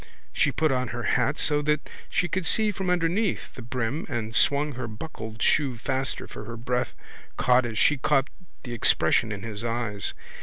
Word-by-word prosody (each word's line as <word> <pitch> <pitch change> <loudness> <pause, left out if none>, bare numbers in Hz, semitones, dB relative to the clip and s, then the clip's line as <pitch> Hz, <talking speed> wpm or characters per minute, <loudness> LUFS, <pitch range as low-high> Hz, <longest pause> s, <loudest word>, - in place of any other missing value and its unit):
She - - +2
put 155 -2 +1
on 130 -1 0
her - - -4
hat - - +1
so 150 0 +2
that 150 0 0 0.2
she 175 - +1
could 175 -1 -1
see 215 +3 +4
from 190 -2 -3
underneath 180 +4 0
the - - -9
brim 120 +4 -3
and 110 -2 -3
swung 145 +1 +3
her 125 -1 -5
buckled 110 -2 -6
shoe 135 -6 +2
faster 130 +2 -1
for - - -8
her 115 0 -7
breath 125 +1 -2 0.4
caught 125 -1 +4
as 110 -2 -5
she 150 - +4
caught 135 0 +2 0.4
the 120 - -6
expression 110 -1 +3
in 100 0 -5
his 110 -1 -5
eyes. 115 -4 -2
125 Hz, 185 wpm, -26 LUFS, 115-150 Hz, 0.4 s, see